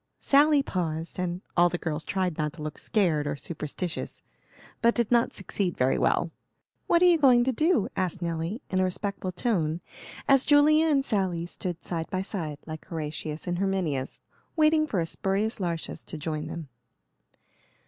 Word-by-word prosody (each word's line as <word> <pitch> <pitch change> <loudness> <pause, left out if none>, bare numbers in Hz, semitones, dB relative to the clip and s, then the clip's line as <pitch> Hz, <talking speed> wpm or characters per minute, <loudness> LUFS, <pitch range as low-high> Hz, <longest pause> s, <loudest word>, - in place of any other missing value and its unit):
Sally 290 0 +5
paused, 165 -5 -3
and 180 0 -2
the 175 0 +4
girls 155 -2 -3
all - - -17
tried 185 -3 0
not 150 -1 -2
to 155 - -9
look 155 -1 -5
"scared" 165 -9 +1
or 145 - -1
"superstitious," 160 +3 -4 0.6
but 235 0 +4
did 235 -2 0
not 235 -1 +4
succeed 190 -2 -2
very 130 +1 +2
well. - - +1 0.6
"What 340 +1 +4
are - - +7
you 345 -2 +5
going 250 -4 +6
to 260 - +1
do?" 310 - +2
asked 185 -1 -1
Nelly, 170 - -3
in 185 - +1
a - - +3
respectful 185 0 -2
tone, 175 -5 0 0.5
as 270 -1 +5
Julia 305 +2 +5
and 280 -3 +2
Sally 185 -7 0
stood 175 0 -6
side 165 -2 -3
by 185 0 -1
side, 160 -7 -4
like 155 -1 -7
Horatius 155 -1 -5
and 175 0 -2
Herminius 180 -9 -1 0.4
waiting 310 -1 +4
for 205 -10 -1
a - - 0
Spurius 195 +6 -1
Lartius 170 -3 -3
to - - -4
join 155 0 -3
them. 165 -3 -6
180 Hz, 170 wpm, -27 LUFS, 160-235 Hz, 0.6 s, are